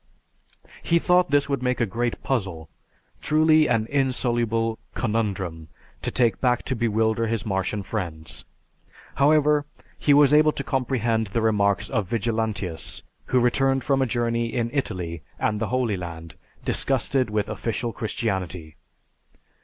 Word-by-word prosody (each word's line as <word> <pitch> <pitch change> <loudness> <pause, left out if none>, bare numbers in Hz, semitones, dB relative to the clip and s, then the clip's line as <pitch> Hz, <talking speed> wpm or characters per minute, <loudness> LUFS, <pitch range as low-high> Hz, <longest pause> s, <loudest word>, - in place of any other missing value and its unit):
He 170 - +2
thought 180 0 +3
this 145 0 +2
would 140 -3 -1
make 125 0 0
a 120 - +3
great 115 +4 -3
puzzle, 95 -11 -2 0.5
truly 155 0 +4
an 115 -2 +1
insoluble 120 -4 0 0.2
conundrum, 100 -8 -2 0.3
to - - -1
take 120 -5 +1
back 125 -2 +2
to 130 - -2
bewilder 110 0 +1
his 115 -1 -2
Martian 95 0 -1
friends. 85 -5 -5 0.7
However, 150 0 +3 0.3
he 145 - +2
was 145 0 +6
able 155 0 +5
to - - -4
comprehend 120 -4 0
the 115 +4 -1
remarks 100 -3 +2
of 105 -8 -2
Vigilantius, 110 -6 -2 0.2
"who 130 - +2
returned 135 +2 +2
from 135 -2 +1
a 130 - +2
journey 115 0 0
in 115 -2 -1
Italy 90 - -3 0.2
and 105 -1 0
the 110 - 0
Holy 125 -5 0
Land 85 -2 -7 0.3
disgusted 130 -1 0
with 105 0 -1
official 115 0 -3
Christianity. 95 -8 -3
115 Hz, 140 wpm, -24 LUFS, 100-130 Hz, 0.7 s, was